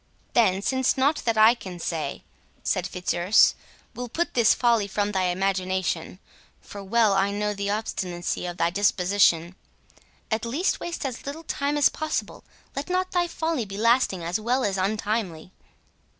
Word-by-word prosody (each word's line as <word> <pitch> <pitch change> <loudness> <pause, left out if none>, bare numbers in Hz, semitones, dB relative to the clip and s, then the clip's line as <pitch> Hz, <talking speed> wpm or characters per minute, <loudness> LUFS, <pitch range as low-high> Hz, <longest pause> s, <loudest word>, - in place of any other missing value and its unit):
"Then 195 -5 +3
since 260 +2 +1
nought 280 +4 +3
that 230 -2 +1
I 220 +2 +7
can 190 -7 -9
say," 160 -4 -4 0.4
said 185 +1 0
Fitzurse, 180 +1 +3 0.4
"will 245 0 -6
put 340 +8 -2
this 235 -3 +4
folly 235 -4 +2
from 205 0 -1
thy 190 -2 0
imagination, 185 -2 -1 0.4
(for 200 -1 -10
well 215 +1 +3
I 195 0 +2
know 210 +1 -1
the 200 0 -3
obstinacy 180 -5 -3
of 175 0 -6
thy 170 0 +1
disposition,) 180 -3 +2 0.8
at 220 0 0
least 280 +11 0
waste 340 -4 -5
as 260 0 -5
little 305 +4 -6
time 290 -2 -1
as 290 - +5
possible—let 310 -1 -6
not 370 +1 0
thy 350 -1 +1
folly 320 -6 -2
be 195 -1 -8
lasting 230 -5 +2
as 175 +5 -1
well 245 +4 0
as 200 -2 0
untimely." 195 -3 -2
210 Hz, 155 wpm, -25 LUFS, 185-245 Hz, 0.8 s, I